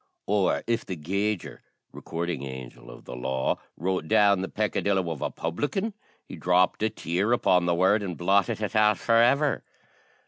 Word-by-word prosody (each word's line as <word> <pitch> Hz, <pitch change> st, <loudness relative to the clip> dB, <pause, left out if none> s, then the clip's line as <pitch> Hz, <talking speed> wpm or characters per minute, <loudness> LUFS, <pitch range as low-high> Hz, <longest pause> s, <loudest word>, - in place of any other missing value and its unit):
Or 100 Hz, -2 st, +1 dB
if 115 Hz, 0 st, 0 dB
the 95 Hz, -, -5 dB
gauger 100 Hz, +5 st, -3 dB, 0.3 s
recording 85 Hz, 0 st, -4 dB
angel 65 Hz, -3 st, -9 dB
of -, -, -13 dB
the 60 Hz, -, -7 dB
law 65 Hz, +1 st, -1 dB, 0.2 s
wrote 90 Hz, -1 st, -2 dB
down 100 Hz, +1 st, +4 dB
the 95 Hz, -, -4 dB
peccadillo 100 Hz, -4 st, 0 dB
of 75 Hz, -, -6 dB
a -, -, -1 dB
publican, 145 Hz, -, -3 dB, 0.3 s
he -, -, -9 dB
dropped 90 Hz, +2 st, +2 dB
a 110 Hz, -, +2 dB
tear 100 Hz, +1 st, -1 dB
upon 90 Hz, -7 st, +3 dB
the 85 Hz, -, +2 dB
word, 95 Hz, +4 st, +3 dB
and 90 Hz, -4 st, -5 dB
blotted 100 Hz, +4 st, +1 dB
it 105 Hz, -, -3 dB
out 105 Hz, -2 st, +4 dB
for 115 Hz, +5 st, +2 dB
ever! 140 Hz, +5 st, +3 dB
95 Hz, 170 wpm, -26 LUFS, 85-105 Hz, 0.3 s, down